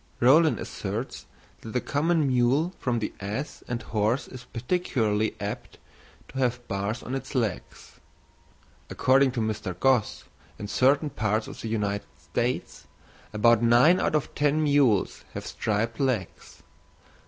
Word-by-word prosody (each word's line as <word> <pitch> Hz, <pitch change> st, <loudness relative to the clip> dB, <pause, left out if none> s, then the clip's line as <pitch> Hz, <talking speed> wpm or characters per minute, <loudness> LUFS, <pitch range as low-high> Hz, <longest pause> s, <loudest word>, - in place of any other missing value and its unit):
Rollin 155 Hz, +6 st, +5 dB
asserts 105 Hz, -, -5 dB, 0.3 s
that 110 Hz, -, -8 dB
the 125 Hz, -, +2 dB
common 155 Hz, +4 st, +1 dB
mule 130 Hz, +7 st, +2 dB
from 125 Hz, -2 st, 0 dB
the 110 Hz, -2 st, -3 dB
ass 105 Hz, +9 st, -5 dB
and 120 Hz, -1 st, -3 dB
horse 110 Hz, +4 st, 0 dB
is 125 Hz, -2 st, -10 dB
particularly 115 Hz, -, -1 dB
apt 100 Hz, +1 st, -6 dB, 0.5 s
to 135 Hz, -, -6 dB
have 120 Hz, -1 st, -1 dB
bars 100 Hz, +4 st, -3 dB
on 125 Hz, -, -6 dB
its 135 Hz, +1 st, -5 dB
legs; 110 Hz, -, -3 dB, 0.9 s
according 135 Hz, +1 st, +3 dB
to 120 Hz, -, -1 dB
Mr. 105 Hz, -4 st, -3 dB
Gosse, 130 Hz, -5 st, +2 dB, 0.3 s
in 105 Hz, -, -6 dB
certain 140 Hz, +6 st, +2 dB
parts 110 Hz, 0 st, -1 dB
of -, -, -9 dB
the -, -, -5 dB
United 105 Hz, -2 st, -2 dB
States, -, -, -3 dB, 0.4 s
about 115 Hz, +1 st, +4 dB
nine 120 Hz, +10 st, +5 dB
out -, -, +1 dB
of 150 Hz, -, -1 dB
ten 150 Hz, +1 st, +1 dB
mules 140 Hz, -9 st, +2 dB
have -, -, -5 dB
striped 110 Hz, +2 st, -2 dB
legs. 125 Hz, -9 st, -3 dB
120 Hz, 140 wpm, -26 LUFS, 110-135 Hz, 0.9 s, Rollin